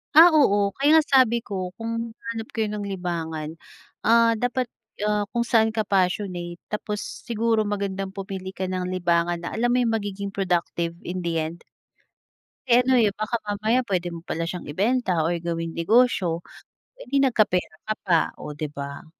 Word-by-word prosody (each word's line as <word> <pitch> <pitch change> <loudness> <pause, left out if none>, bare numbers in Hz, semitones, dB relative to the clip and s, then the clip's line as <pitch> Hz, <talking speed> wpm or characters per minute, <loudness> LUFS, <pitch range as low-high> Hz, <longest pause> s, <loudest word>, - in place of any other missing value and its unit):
Ah, 335 +3 +10
oo. 205 -11 +4
Kaya 305 +3 +6
nga - - -8
sabi 245 -4 +5
ko, 185 -3 -5
kung 230 +1 -4
hahanap 225 -1 -6
kayo 220 -2 0
ng 210 -1 -4
libangan, 165 -4 -4 0.5
ah, 230 0 +5
dapat, 245 +1 -1 0.3
ah, 210 -1 +1
kung 235 - +1
saan 225 -2 +3
ka 220 - +1
passionate. 180 -3 -1
Tapos 210 0 -3 0.2
siguro 225 -2 +1
magandang 195 -1 -3
pumili 190 -1 -6
ka 185 -1 -3
ng 185 0 -2
libangan 175 -1 +1
na 170 - -4
alam 240 +1 +2
mo - - +3
yung 230 -2 +1
magiging 200 -1 -4
productive 175 -3 -1
in 180 0 -5
the 165 -1 0
end. 160 +2 -6 1.0
Eh 240 0 +6
ano 255 +1 +3
eh, 220 -4 +4
baka 215 +3 -3
mamaya 215 +5 +1
puwede 185 -5 -1
mo 165 - -9
pala 165 -1 -3
siyang 180 0 -5
ibenta 200 - +1
or 165 +2 +1
gawing 165 -1 -3
negosyo, 180 -2 +3 0.6
eh - - -10
di 275 +2 +1
nagkapera 210 -10 +2
ka 215 - 0
pa, 175 -4 +3 0.2
oh 150 0 -7
'di 155 - -2
ba? 140 0 -6
200 Hz, 170 wpm, -24 LUFS, 175-230 Hz, 1.0 s, Ah